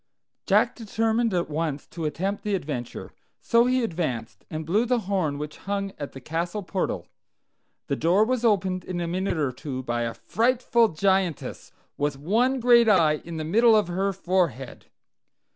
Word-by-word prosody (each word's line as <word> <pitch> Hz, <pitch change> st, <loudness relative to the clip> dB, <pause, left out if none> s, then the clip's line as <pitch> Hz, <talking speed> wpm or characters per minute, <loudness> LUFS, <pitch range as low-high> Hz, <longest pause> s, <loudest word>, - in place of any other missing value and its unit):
Jack -, -, +3 dB
determined 225 Hz, +1 st, 0 dB
at 175 Hz, -2 st, 0 dB
once 155 Hz, -2 st, -3 dB
to 165 Hz, -2 st, -6 dB
attempt 185 Hz, +7 st, -2 dB
the 210 Hz, -1 st, 0 dB
adventure; 140 Hz, -9 st, -5 dB, 0.3 s
so 235 Hz, +1 st, +3 dB
he 255 Hz, 0 st, +2 dB
advanced, 160 Hz, -, -3 dB
and 155 Hz, 0 st, -5 dB
blew 200 Hz, +8 st, +2 dB
the 245 Hz, -1 st, +1 dB
horn 185 Hz, -7 st, -1 dB
which 150 Hz, +1 st, -6 dB
hung 200 Hz, -1 st, -1 dB
at 145 Hz, -, -6 dB
the 135 Hz, -, -8 dB
castle 170 Hz, +9 st, -3 dB
portal. 185 Hz, +1 st, -2 dB, 0.8 s
The 140 Hz, -, -1 dB
door 175 Hz, +9 st, +3 dB
was 250 Hz, 0 st, -1 dB
opened 190 Hz, -5 st, +1 dB
in 180 Hz, -1 st, -4 dB
a 170 Hz, -, -2 dB
minute 185 Hz, +1 st, -1 dB
or 145 Hz, -4 st, 0 dB
two 130 Hz, 0 st, -6 dB
by 120 Hz, -1 st, -2 dB
a 115 Hz, -1 st, -2 dB
frightful 235 Hz, 0 st, +2 dB
Giantess, 190 Hz, -1 st, -1 dB, 0.3 s
with 145 Hz, -1 st, -1 dB
one 235 Hz, -, +1 dB
great 235 Hz, -1 st, +6 dB
eye 155 Hz, -7 st, +4 dB
in 170 Hz, -1 st, -7 dB
the 155 Hz, -, -3 dB
middle 225 Hz, +7 st, +5 dB
of 210 Hz, -5 st, +2 dB
her 190 Hz, +3 st, 0 dB
forehead. 180 Hz, -8 st, -2 dB
185 Hz, 170 wpm, -25 LUFS, 155-220 Hz, 0.8 s, great